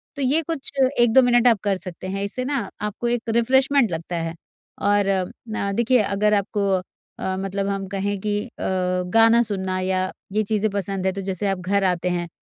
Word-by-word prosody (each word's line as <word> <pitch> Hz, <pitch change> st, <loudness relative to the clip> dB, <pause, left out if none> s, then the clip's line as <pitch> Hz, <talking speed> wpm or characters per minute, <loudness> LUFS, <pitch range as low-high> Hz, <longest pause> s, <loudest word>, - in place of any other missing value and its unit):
तो 285 Hz, -, -5 dB
ये 275 Hz, +5 st, +2 dB
कुछ 320 Hz, -3 st, -4 dB, 0.3 s
1-2 240 Hz, +2 st, +6 dB
मिनट 245 Hz, 0 st, +4 dB
आप 225 Hz, -4 st, +4 dB
कर 200 Hz, -2 st, +1 dB
सकते 185 Hz, 0 st, -8 dB
हैं 195 Hz, +1 st, -3 dB
इससे 225 Hz, +5 st, -3 dB
ना 265 Hz, -8 st, -2 dB
आपको 210 Hz, +3 st, -3 dB
एक 235 Hz, -1 st, -1 dB
रिफ्रेश्मेन्ट 255 Hz, +1 st, +3 dB
लगता 165 Hz, +1 st, -4 dB
है। 165 Hz, 0 st, -3 dB, 0.5 s
और 205 Hz, 0 st, +3 dB, 0.4 s
न 200 Hz, -2 st, -2 dB
देखिए 235 Hz, +2 st, +3 dB
अगर 210 Hz, +1 st, +1 dB
आपको 200 Hz, 0 st, 0 dB, 0.5 s
अ, 190 Hz, 0 st, -2 dB
मतलब 195 Hz, +1 st, -2 dB
हम 195 Hz, -1 st, -2 dB
कहें 200 Hz, +1 st, -2 dB
कि 210 Hz, -1 st, 0 dB
अ, -, -, -12 dB, 0.7 s
गाना 225 Hz, +1 st, +6 dB
सुनना 190 Hz, -3 st, -2 dB
या 185 Hz, 0 st, 0 dB, 0.2 s
ये 215 Hz, -, +2 dB
चीज़े 215 Hz, +1 st, 0 dB
पसंद 195 Hz, -1 st, -2 dB
है 190 Hz, -, +3 dB
तो 195 Hz, -, -4 dB
जैसे 195 Hz, +1 st, -2 dB
आप 195 Hz, -1 st, -1 dB
घर 195 Hz, +2 st, 0 dB
आते 180 Hz, -1 st, +1 dB
हैं, 175 Hz, -1 st, -2 dB
200 Hz, 195 wpm, -23 LUFS, 190-230 Hz, 0.7 s, 1-2